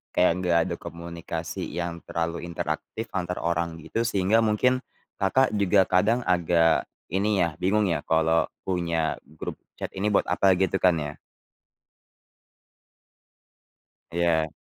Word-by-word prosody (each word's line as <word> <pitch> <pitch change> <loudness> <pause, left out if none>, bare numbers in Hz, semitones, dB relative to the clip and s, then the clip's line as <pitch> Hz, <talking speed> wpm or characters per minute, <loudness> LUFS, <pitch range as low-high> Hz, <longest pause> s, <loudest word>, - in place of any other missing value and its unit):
kayak 90 - +5
enggak 90 -2 +2
ada 90 -2 -3
komunikasi 85 -1 -6
yang 85 -1 -4
terlalu 85 +1 -2
interaktif 85 +7 -4
antar 90 -2 -2
orang 85 0 -1
gitu 115 - -2
sehingga 100 +1 +3
mungkin, 120 +4 +2 0.4
Kakak 130 +8 +3
juga 100 0 +4
kadang 110 +7 +3
agak 85 -2 +3 0.3
ini 100 0 +1
ya, 85 -2 -2
bingung 100 +1 +2
ya 80 - 0
kalau 80 0 +3 0.2
punya 85 -3 -1
grup 80 +1 -7 0.2
chat - - -5
ini 100 +2 0
buat - - +2
apa 95 -1 +4
gitu 95 -1 +1
kan 90 -2 +5
ya. 75 0 -5 3.0
Iya. 85 -2 +2
85 Hz, 125 wpm, -26 LUFS, 85-95 Hz, 3.0 s, kayak